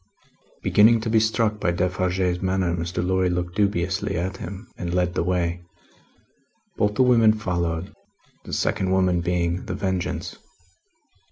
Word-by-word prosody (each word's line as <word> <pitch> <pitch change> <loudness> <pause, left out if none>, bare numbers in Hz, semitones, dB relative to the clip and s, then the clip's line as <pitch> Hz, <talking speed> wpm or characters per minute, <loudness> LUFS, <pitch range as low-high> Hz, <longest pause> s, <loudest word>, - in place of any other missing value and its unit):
Beginning 110 +3 +5
to 110 0 -2
be 110 - +5
struck 110 -1 +1
by 90 - 0
Defarge's 90 0 0
manner, 95 -2 0
Mr. 85 +1 -3
Lorry 95 0 +1
looked 90 0 -2
dubiously 95 -4 0
at 95 +3 -3
him, 95 +4 -7
and 85 0 -4
led 90 -1 +1
the - - 0
way. 90 -1 -1 1.1
Both 105 0 0
the 130 - +4
women 115 -4 +5
followed; 85 -4 -2 0.5
the - - -9
second 95 - 0
woman 95 -2 +2
being 85 0 -1
The 95 - -3
Vengeance. 90 -3 -3
90 Hz, 145 wpm, -24 LUFS, 90-100 Hz, 1.1 s, Beginning